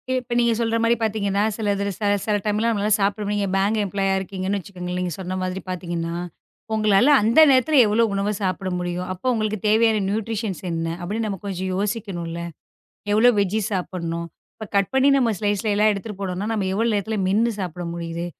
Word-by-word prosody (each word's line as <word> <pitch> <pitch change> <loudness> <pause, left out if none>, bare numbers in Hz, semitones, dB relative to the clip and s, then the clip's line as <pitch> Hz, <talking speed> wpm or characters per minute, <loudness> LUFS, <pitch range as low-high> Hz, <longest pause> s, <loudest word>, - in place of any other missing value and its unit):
இப்ப 250 -1 -3
நீங்கச் 235 -1 +2
சொல்ற 230 -1 0
மாரி 230 +1 +4
பாத்தீங்கன்னா 205 -2 0
சிலது 205 -2 -1 0.4
சில 210 - +1
டைம்லாம் 215 +2 +1
நம்மளால 210 -1 0
சாப்பிட 200 +2 0
முடியும். 205 0 -1
நீங்க 200 - 0
பேங்க் 200 +3 +1
எம்ப்லாயீ 195 0 -1
ஆ 190 - +1
இருக்கீங்கன்னு 190 +1 -3
வச்சுக்கோங்களேன், 180 -1 -6
நீங்கச் 180 0 -3
சொன்ன 185 0 -4
மாதிரி 185 +1 -3
பாத்தீங்கன்னா 170 -2 -3 0.6
உங்களால 215 +3 +4
அந்த 230 +7 +4
நேரத்துல 270 +3 +3
எவ்வளவு 215 +1 +2
உணவை 200 +1 0
சாப்பிட 190 -1 -2
முடியும்? 180 0 -3
அப்போ 185 +7 -5
உங்களுக்குத் 215 -2 -2
தேவையான 220 0 +4
ந்யூட்ரிஷன்ஸ் 215 -1 -2
என்ன 165 0 -2
அப்படின்னு 210 +6 -2
நம்ம 195 -3 -4
கொஞ்சம் 190 -1 -3
யோசிக்கணும்ல. 195 -5 -3 0.7
எவ்வளவு 225 +3 +5
வெஜ்ஜீஸ் 200 +1 0
சாப்பிடணும்? 170 -2 -3 0.3
இப்ப 220 - -7
கட் 200 -1 +2
பண்ணி 265 +1 +4
நம்ம 245 -4 +2
ஸ்லைஸ் 205 0 0
எல்லாம் 210 +1 +4
எடுத்துட்டு 200 0 -7
போணும்னா 190 +1 -3
நம்ம 205 -4 -1
எவ்வளவு 225 +3 +1
நேரத்துல 215 +2 -2
மென்னு 220 +5 +2
சாப்பிட 180 -2 -4
முடியுது? 170 0 -4
200 Hz, 175 wpm, -22 LUFS, 185-220 Hz, 0.7 s, எவ்வளவு